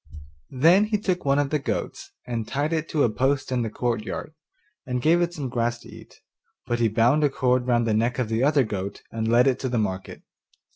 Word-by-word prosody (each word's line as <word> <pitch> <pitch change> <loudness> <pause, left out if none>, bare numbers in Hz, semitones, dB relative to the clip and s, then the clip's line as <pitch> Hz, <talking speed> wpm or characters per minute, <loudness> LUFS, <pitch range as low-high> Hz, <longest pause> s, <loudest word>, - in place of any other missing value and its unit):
Then 165 +10 +4
he 215 0 0
took 185 -5 -2
one 140 0 +3
of 145 -1 0
the 150 - +1
goats 140 - -4 0.2
and 115 -3 -4
tied 145 +4 -1
it 160 -1 -2
to 150 - +1
a - - +3
post 135 +3 0
in 125 -1 0
the 115 - -2
courtyard, 115 +5 -3 0.5
and 125 -1 -3
gave 165 +7 +3
it 170 0 0
some 150 -6 -5
grass 120 -1 -1
to - - -14
eat; - - -14 0.4
but 120 0 -1
he 115 - +3
bound 120 +7 +2
a 145 - +4
cord 125 -2 0
round 120 -1 +2
the 110 - +1
neck 115 +4 0
of 125 -3 -1
the 115 +3 0
other 145 -1 +4
goat 100 -3 -5
and 110 0 -3
led 120 +1 +5
it 135 -2 +2
to 130 - -2
the 120 - -1
market. 95 -3 -3
125 Hz, 230 wpm, -24 LUFS, 115-145 Hz, 0.5 s, led